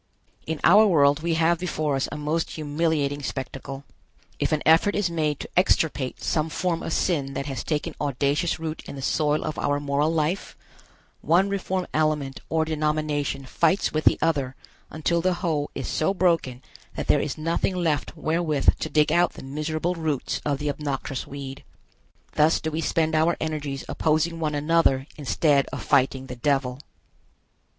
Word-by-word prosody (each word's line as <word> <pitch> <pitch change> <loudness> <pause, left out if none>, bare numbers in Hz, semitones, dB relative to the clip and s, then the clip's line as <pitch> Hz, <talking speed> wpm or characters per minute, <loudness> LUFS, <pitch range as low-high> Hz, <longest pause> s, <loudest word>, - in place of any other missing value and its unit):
In 160 -1 -2
our 210 +5 +7
world 145 -5 +4
we 165 0 0
have 165 +1 +2
before 155 -5 -1
us 135 - -1
a - - -5
most 155 +2 -1
humiliating 150 -2 -1
spectacle. 135 0 -5 0.6
If - - 0
an 155 -1 0
effort 165 +6 +5
is 195 -4 0
made 155 -3 0
to - - -7
extirpate 155 -7 +1
some 155 0 0
form 170 0 -1
of - - -4
sin 140 -6 0
that 140 - -3
has 135 -2 -4
taken 150 -2 -2
audacious 145 +4 0
root 160 -1 -5
in - - -7
the 135 - -7
soil 150 +2 +1
of 155 - -4
our 145 0 +1
moral 145 +2 +1
life, 165 +4 -1 0.6
one 185 +4 +3
reform 190 -2 -2
element 150 -3 0
or 160 0 +1
denomination 150 -3 -1
fights 170 +8 +1
with 155 0 -1
the - - +5
other 140 -5 0 0.3
until 170 +2 0
the 185 +1 +1
hoe 160 -5 -1
is 135 - -4
so 195 +5 0
broken 165 -9 +1 0.3
that - - -3
there - - +3
is 145 - -3
nothing 165 +4 0
left 165 -2 -1
wherewith 155 -2 +1
to - - -3
dig 150 0 +3
out 175 +1 +3
the - - -10
miserable 155 +5 -2
roots 160 -6 -2
of 145 -2 0
the 145 +1 -1
obnoxious 140 -2 -4
weed. 135 -1 -7 0.7
Thus 155 +2 +3
do 160 - -3
we 160 +1 -2
spend 160 0 +1
our 160 +2 +2
energies 150 -3 -3
opposing 160 +1 0
one 155 -2 -1
another 145 -3 +2
instead 145 0 +2
of - - -6
fighting 135 -1 +2
the 125 -1 -7
Devil. 135 -1 0
155 Hz, 170 wpm, -25 LUFS, 140-165 Hz, 0.7 s, our